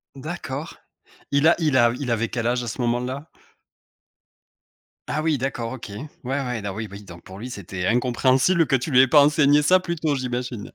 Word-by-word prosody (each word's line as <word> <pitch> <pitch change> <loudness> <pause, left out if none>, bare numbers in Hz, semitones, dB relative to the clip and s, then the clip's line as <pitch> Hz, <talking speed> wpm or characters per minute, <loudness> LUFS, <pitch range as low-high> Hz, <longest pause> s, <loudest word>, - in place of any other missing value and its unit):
D'accord, 150 +1 -6 0.6
il 140 +2 +3
a 170 - +6
il 150 -5 +2
av 120 -1 +4
il 125 - -3
avait 115 0 0
quel 115 -1 -2
âge 125 0 0
à 120 - -6
ce 125 +2 -4
moment-là? 125 +5 -2 1.8
Ah 155 - -1
oui, 155 -3 +1
d'accord, 125 -3 -3
OK. 120 -4 -8
Ouais, 105 +9 -7 0.2
ouais, 125 -3 -2
don 100 -1 -4
oui 110 0 -4
oui 100 +1 -10
donc 85 -2 -13
pour 95 +1 -11
lui, 125 +4 -6
c'était 95 -5 -6
incompréhensible 130 +7 +2
que - - +2
tu 130 +4 -2
lui 130 0 +7
aies 135 - +5
pas 145 +2 +6
enseigné 145 0 +4
ça 185 +5 +4
plus 170 -2 -4
tôt, 155 -2 -1
j'imagine? 125 -3 -4
130 Hz, 200 wpm, -23 LUFS, 115-145 Hz, 1.8 s, lui